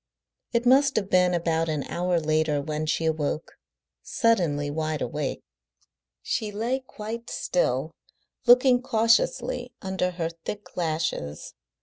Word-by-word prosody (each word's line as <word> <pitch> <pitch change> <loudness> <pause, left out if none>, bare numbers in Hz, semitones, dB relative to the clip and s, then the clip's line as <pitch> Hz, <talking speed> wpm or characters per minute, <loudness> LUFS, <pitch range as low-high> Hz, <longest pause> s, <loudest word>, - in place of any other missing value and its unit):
It 235 +1 0
must 270 +2 +5
have 200 -3 -1
been 180 -1 +4
about 165 -1 0
an 150 -3 -1
hour 175 0 0
later 155 -1 +1
when 155 +2 -3
she 160 +1 0
awoke, 155 -1 -1 0.5
suddenly 165 - +1
wide 155 0 -2
awake. 145 +3 -3 0.8
She 215 -2 -2
lay 230 +6 -1
quite 230 -2 -7
still, - - 0 0.6
looking 250 0 +6
cautiously 255 - +1
under 190 -1 -1
her 170 -2 -3
thick 205 0 -7
lashes. 155 - -2
180 Hz, 120 wpm, -26 LUFS, 155-230 Hz, 0.8 s, looking